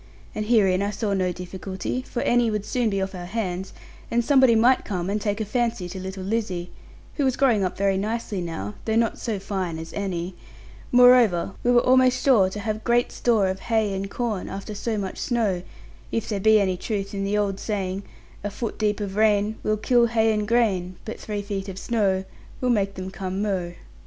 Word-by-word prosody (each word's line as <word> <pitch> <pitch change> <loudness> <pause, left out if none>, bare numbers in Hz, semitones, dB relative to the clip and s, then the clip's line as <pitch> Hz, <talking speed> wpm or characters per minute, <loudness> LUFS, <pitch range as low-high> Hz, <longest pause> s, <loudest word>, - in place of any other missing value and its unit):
And 215 0 -3
herein 195 -5 +4
I 200 - 0
saw 205 0 -2
no 185 -2 +1
difficulty; 185 +5 -5
for 250 -1 -4
Annie 240 -1 +3
would 210 -1 -2
soon 245 -1 0
be 195 -1 -1
off 190 - -5
our 175 -1 -6
hands, 190 -3 -3 0.4
and 235 0 +1
somebody 260 -4 +5
might 245 +4 +4
come 185 -2 -3
and 210 +1 -1
take 205 0 -1
a 220 - -1
fancy 230 -3 -1
to 190 +1 -6
little 190 0 -6
Lizzie 190 -4 -2 0.5
(who 290 - +1
was 260 -2 +1
growing 240 -7 +3
up 185 - -2
very 195 -1 +2
nicely 210 -1 -2
now, 135 - -4
though 220 - 0
not 230 0 +1
so 225 -3 -2
fine 190 -4 -3
as 160 0 -8
Annie); 185 -3 -3 0.6
moreover, 245 -8 +6
we 245 - +2
were 240 -1 +4
almost 255 0 +4
sure 220 -9 +5
to 205 +2 -6
have 215 0 -3
great 240 0 +2
store 220 -5 +2
of 190 0 -2
hay 220 -3 0
and 195 +1 -3
corn 220 -4 -3
after 195 +2 -6
so 215 +2 -2
much 195 -2 -4
snow, 215 -7 0 0.5
if 225 - -1
there 205 -3 -2
be 220 +2 +5
any 190 -2 +1
truth 200 0 -3
in 195 0 -2
the 200 +1 0
old 200 -2 0
saying, 195 -3 -2 0.4
"A 205 - -1
foot 210 +3 -5
deep 210 -1 0
of 195 -1 -4
rain 215 0 +2
Will 215 0 0
kill 240 +2 +3
hay 225 -1 +2
and 210 -1 -1
grain; 200 -6 +1
But 225 - -6
three 205 -1 -4
feet 200 -1 -4
of 190 - -7
snow 195 -3 0 0.4
Will 250 -1 +1
make 195 -3 +1
them 185 0 -6
come 190 +1 -3
mo'." 185 -4 -2
205 Hz, 210 wpm, -24 LUFS, 190-230 Hz, 0.6 s, moreover